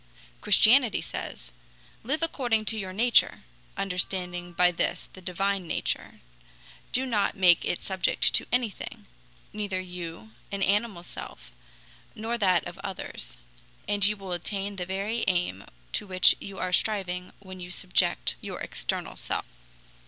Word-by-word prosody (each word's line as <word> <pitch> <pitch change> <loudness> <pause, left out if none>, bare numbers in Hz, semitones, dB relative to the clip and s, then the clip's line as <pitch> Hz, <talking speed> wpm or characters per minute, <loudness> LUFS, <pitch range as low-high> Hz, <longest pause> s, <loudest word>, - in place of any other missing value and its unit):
Christianity - - +6
says: - - -6 0.5
"Live 300 +7 -1
according 240 -9 +1
to 220 - +3
your 190 -2 -4
nature 230 +5 +3 0.3
[understanding 180 -2 -2
by 180 +1 +4
this 170 - -2
the 185 - -11
divine 190 +1 -1
nature]; - - -3 0.7
do 260 +1 +4
not 210 -6 +1
make 180 -3 +6
it 175 - -2
subject 190 -2 +1
to - - +4
anything 240 -4 -2 0.5
neither 205 -3 -2
you 170 -11 -7 0.2
(an 200 -1 -1
animal 205 -3 +1
self) - - -9 0.6
nor 225 +2 -2
that 185 -4 +3
of 175 +2 -8
others 175 - -5 0.5
and 205 0 +2
you 210 +1 +5
will 195 -2 -8
attain 195 +3 -2
the 180 -1 -3
very 200 +5 -1
aim 175 - 0 0.3
to 210 - -2
which 185 -1 +5
you 195 -1 -8
are 185 0 -2
striving 180 -3 0
when 185 -2 -11
you 175 0 -7
subject 170 - +1
your - - -5
external - - -3
self." - - -3
190 Hz, 140 wpm, -28 LUFS, 180-205 Hz, 0.7 s, Christianity